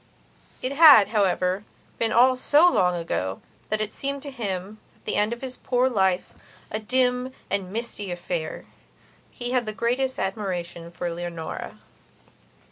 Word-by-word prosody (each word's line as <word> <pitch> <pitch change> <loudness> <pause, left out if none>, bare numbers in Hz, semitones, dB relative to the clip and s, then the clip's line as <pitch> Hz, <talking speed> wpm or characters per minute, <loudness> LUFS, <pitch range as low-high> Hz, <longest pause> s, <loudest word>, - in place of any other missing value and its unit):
It 255 - -1
had, 280 -8 +8
however, 190 -2 +1 0.4
been 225 -1 +1
all 255 +3 +5
so 295 +6 +5
long 180 - +3
ago 95 - -3 0.3
that 215 0 0
it 215 0 -3
seemed 280 0 -3
to 285 - -6
him, 205 -4 -4 0.2
at - - -31
the - - -1
end 210 +2 +2
of 235 - -5
his 255 -1 -6
poor 250 0 +1
life, 190 -4 +1 0.4
a 215 - -2
dim 250 +2 +1 0.2
and 195 -2 -1
misty 220 -3 -4
affair. 175 -2 -4 0.6
He 245 0 -5
had 250 -3 +1
the 215 - -3
greatest 250 +5 -1
admiration 180 -4 -3
for 175 0 -4
Leonora. 170 -1 -6
215 Hz, 150 wpm, -25 LUFS, 180-250 Hz, 0.6 s, had